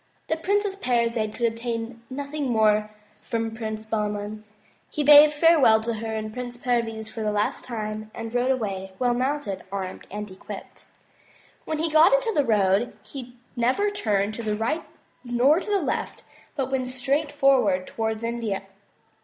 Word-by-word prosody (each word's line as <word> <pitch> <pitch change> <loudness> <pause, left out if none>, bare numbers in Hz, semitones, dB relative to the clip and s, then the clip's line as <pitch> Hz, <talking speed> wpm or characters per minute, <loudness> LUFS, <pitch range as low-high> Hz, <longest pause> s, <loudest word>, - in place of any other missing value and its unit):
The 320 - +2
Princess 405 +4 0
Parizade 235 - 0
could 235 - 0
obtain 230 0 -3
nothing 280 +1 -3
more 215 -2 +3 0.3
from 225 -1 -2
Prince 220 -1 -5
Bahman. 210 -1 -3 0.5
He 300 - -2
bade 295 +1 +9
farewell 295 -7 +5
to 235 +1 -1
her 225 +1 -5
and 215 0 -4
Prince 245 0 -6
Perviz 230 -3 -1
for 220 +1 -7
the 215 -1 0
last 210 0 -1
time, 215 -2 -5
and 225 0 -6
rode 245 +1 +1
away, 195 -7 -2
well 245 -1 +2
mounted, 255 -6 -1
armed 190 -2 -5
and 210 0 -6
equipped. 185 - -10 0.8
When 315 - -2
he 320 +2 0
got 315 +8 +6
into - - +2
the 290 - +3
road, 210 -1 +2
he 250 -3 -9 0.2
never 260 +13 +1
turned 210 - 0
to 235 - -5
the 215 -2 -1
right 235 +10 -1 0.4
nor 250 +6 +3
to 420 - -7
the 405 -1 +3
left - - -3 0.3
but 265 -2 -2
went 260 -1 0
straight 270 +4 0
forward 230 -10 +3
towards 220 +1 -3
India. 230 -4 -2
235 Hz, 160 wpm, -25 LUFS, 215-275 Hz, 0.8 s, bade